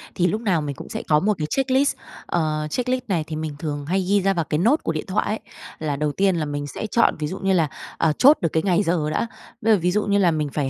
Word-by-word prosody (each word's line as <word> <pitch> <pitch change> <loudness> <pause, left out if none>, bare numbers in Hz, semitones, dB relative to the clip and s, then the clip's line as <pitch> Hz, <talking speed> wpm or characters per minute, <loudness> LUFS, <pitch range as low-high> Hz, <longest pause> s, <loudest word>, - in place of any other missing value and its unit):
Thì 180 - +2
lúc 215 +5 -1
nào 190 -8 +1
mình 145 -2 -4
cũng - - -10
sẽ - - -5
có 150 -1 +4
một 210 +6 +2
cái 150 - -2
checklist, 270 - +2 0.3
ờ, 155 -2 -1
checklist 250 +6 -1
này 170 -6 0
thì 155 - -5
mình 155 -1 -4
thường 145 -2 -4
hay 190 +5 0
ghi 205 0 +4
ra 195 +1 +2
vào 170 -4 -1
cái 150 - -1
note 235 - +3
của - - 0
điện 155 -1 -4
thoại 200 +3 0
ấy, 215 - -1 0.4
là 150 -2 -2
đầu 150 +1 -1
tiên 190 +4 +2
là 160 -2 -1
mình 145 0 -4
sẽ 215 - -5
chọn 235 - +3
ví 150 - -1
dụ 190 +5 -6
như 195 0 +1
là, 160 -4 +2 0.3
ờ, 160 - +2
chốt 285 +4 +7
được 165 - +1
cái 160 - +1
ngày 195 +1 +2
giờ 165 -4 0
đã, 230 - -1 0.3
bây 220 0 +4
giờ 200 - +3
ví 180 +2 +1
dụ 210 +3 0
như 200 0 +2
là 180 -4 +4
mình 150 -2 -1
phải 145 -3 -1
170 Hz, 290 wpm, -23 LUFS, 155-205 Hz, 0.4 s, chốt